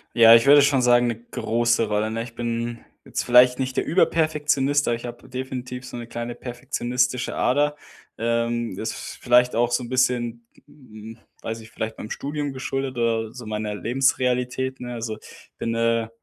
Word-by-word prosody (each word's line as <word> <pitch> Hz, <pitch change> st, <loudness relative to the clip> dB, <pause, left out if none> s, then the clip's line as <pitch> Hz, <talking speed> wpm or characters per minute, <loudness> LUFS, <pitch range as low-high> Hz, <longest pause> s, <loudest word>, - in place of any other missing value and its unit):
Ja, 115 Hz, -1 st, +9 dB
ich 115 Hz, -, +4 dB
würde 145 Hz, +1 st, +8 dB
schon 140 Hz, -2 st, +3 dB
sagen, 120 Hz, 0 st, +4 dB
'ne 115 Hz, -1 st, -3 dB
große 120 Hz, 0 st, +1 dB
Rolle, 105 Hz, +1 st, 0 dB
ne? 115 Hz, +1 st, -2 dB
Ich 115 Hz, 0 st, -9 dB
bin 115 Hz, 0 st, -3 dB, 0.2 s
jetzt -, -, -3 dB
vielleicht 125 Hz, +1 st, +6 dB
nicht 130 Hz, -1 st, -3 dB
der -, -, +1 dB
Überperfektionist, 150 Hz, -4 st, +2 dB
aber 120 Hz, -, +2 dB
ich 115 Hz, +1 st, -8 dB
habe 120 Hz, -, -9 dB
definitiv 125 Hz, -1 st, -6 dB
so 125 Hz, -1 st, -8 dB
'ne 120 Hz, -, -6 dB
kleine 120 Hz, 0 st, -5 dB
perfektionistische 125 Hz, 0 st, -2 dB
Ader. 145 Hz, +3 st, +1 dB, 0.4 s
Ähm, 115 Hz, -1 st, -1 dB
das 110 Hz, +4 st, -4 dB, 0.3 s
vielleicht 125 Hz, 0 st, +3 dB
auch 120 Hz, +1 st, +2 dB
so 120 Hz, -, +1 dB
'n 120 Hz, -, -8 dB
bisschen, 120 Hz, -2 st, 0 dB, 0.2 s
hm 115 Hz, -6 st, -13 dB, 0.2 s
ich -, -, -30 dB
weiß 115 Hz, 0 st, -4 dB
nicht, 110 Hz, 0 st, -14 dB
vielleicht 110 Hz, 0 st, -5 dB
beim 110 Hz, -, -8 dB
Studium 145 Hz, 0 st, -3 dB
geschuldet 135 Hz, 0 st, -3 dB
oder 115 Hz, -2 st, 0 dB
so 125 Hz, -2 st, -9 dB
meiner 105 Hz, -1 st, -3 dB
Lebensrealität, 125 Hz, +2 st, 0 dB
ne? 125 Hz, -1 st, -6 dB
Also, 115 Hz, -2 st, -4 dB
ich -, -, -16 dB
bin, 115 Hz, -, -2 dB
äh, 115 Hz, 0 st, +1 dB
120 Hz, 180 wpm, -23 LUFS, 115-130 Hz, 0.4 s, Ja